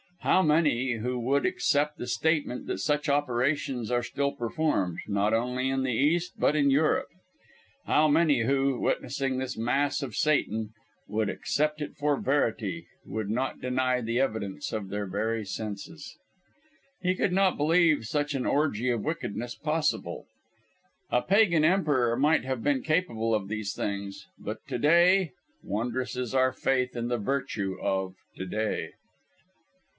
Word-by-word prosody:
How 185 - +4
many 145 -6 +2
who 125 +2 -2
would 135 +4 +1
accept 150 +1 +1
the - - -5
statement 145 0 0
that - - -2
such 150 +7 0
operations 135 -3 0
are 120 0 +1
still 140 +3 -1
performed, 115 - -1
not 100 +1 +1
only 125 +3 0
in 135 0 0
the 130 -2 0
East, 165 +8 +1
but 150 - +3
in 140 -2 +3
Europe? 150 +3 +2 0.8
How 155 +1 +4
many 150 -4 +3
who, 135 +1 +1
witnessing 135 0 -1
this 130 -1 -3
mass 140 +6 0
of 120 -6 -6
Satan, 110 -8 0 0.3
would 105 0 -1
accept 150 +1 -1
it 150 - -5
for 145 -1 0
verity, 145 +4 -1 0.2
would 110 -2 -4
not 125 +5 -2
deny 125 0 0
the 115 +1 -1
evidence 110 -7 -2
of 105 -3 -3
their 105 0 -3
very 110 +4 -1
senses? 110 - -6 0.9
He 185 0 +1
could 185 0 0
not 190 0 +3
believe 155 -3 +3
such 145 +4 -1
an 130 - -2
orgie 125 -5 +1
of 115 - -3
wickedness 120 -6 -3
possible. 155 0 -1 0.9
A 125 - +2
Pagan 190 -5 +4
emperor 145 -10 +2
might 150 +4 +3
have 130 -3 -3
been 140 -3 +1
capable 120 -9 0
of 105 -3 0
these 105 -1 -3
things, 100 -1 -4
but - - -5
to - - -2
day 175 +3 +4 0.3
wondrous 120 +6 -2
is 125 -2 -3
our 130 -1 +3
faith 125 -1 0
in 120 0 -2
the 120 0 0
virtue 110 -5 -2
of 95 -1 -1 0.2
"to 95 - -5
day!" 110 +3 -2
130 Hz, 150 wpm, -28 LUFS, 115-150 Hz, 0.9 s, How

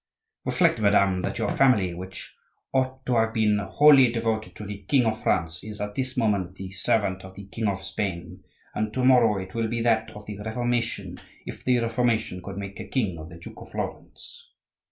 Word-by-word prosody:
"Reflect, - - +2
madame, 100 -3 +3
that - - -3
your - - 0
family, 110 -10 +3
which 95 +2 -8 0.4
ought 130 0 0
to 125 -2 +1
have 110 0 +1
been 105 -2 +3
wholly 135 +4 +6
devoted 115 -2 -2
to 105 - -8
the 100 0 -7
king 135 -4 +4
of 110 -1 -1
France, 85 +2 0
is 105 -1 -8
at 105 0 -4
this 130 +2 -3
moment 100 -6 0
the 95 -1 -7
servant 95 -1 0
of 95 0 -11
the 100 0 -9
king 105 +3 -3
of 95 -1 -2
Spain; 95 -3 -4 0.3
and 110 0 -1
to 130 - 0
morrow 120 -5 +5
it 95 0 -8
will 115 -1 0
be 115 +1 -2
that 115 -1 +2
of 105 0 -10
the 105 -1 -7
Reformation 120 +2 -2 0.3
if - - -8
the 125 -1 +3
Reformation 115 -5 0
could 95 +1 -7
make 100 -1 -6
a - - -6
king 100 -11 -1
of 80 +1 -9
the 85 - -11
Duke 85 - -11
of - - -11
Florence." - - -7
105 Hz, 200 wpm, -26 LUFS, 95-120 Hz, 0.4 s, wholly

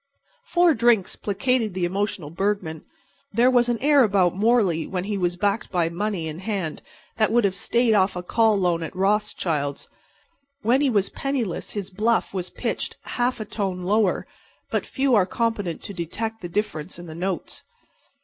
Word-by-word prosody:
Four 350 -7 +4
drinks 235 -7 +3
placated 215 0 0
the 180 -2 0
emotional 190 -4 -2
Bergman. 185 -4 -2 0.5
There 240 +4 +4
was 245 -1 +3
an 240 - +1
air 290 -2 +6
about 190 -5 +3
Morley 200 -6 +2
when 180 -2 -3
he 205 +1 -2
was 175 -2 0
backed 200 +4 0
by 175 -3 +1
money 180 -1 -2
in 155 +1 -6
hand 190 -6 -3 0.4
that 220 -1 +2
would 240 0 +4
have 195 -2 +1
stayed 235 +3 +2
off 190 -2 +3
a 180 - -4
call 220 +3 +3
loan 175 -3 +1
at 165 +3 -6
Rothschilds'. 185 -7 0 0.8
When 245 +5 +3
he 285 - +3
was 205 -5 +2
penniless 260 -10 -3
his 200 -2 -4
bluff 220 +4 +1
was 185 -2 -3
pitched - - -4
half 245 0 -1
a 215 - -4
tone 195 -4 -3
lower, 205 +1 +2 0.5
but - - -1
few 270 -1 +1
are 195 -5 +4
competent 215 -8 -2
to 200 - -6
detect 220 +6 -4
the 175 - -6
difference 185 -4 -3
in 175 - -9
the 160 - -8
notes. 180 +3 -4
200 Hz, 175 wpm, -24 LUFS, 180-225 Hz, 0.8 s, air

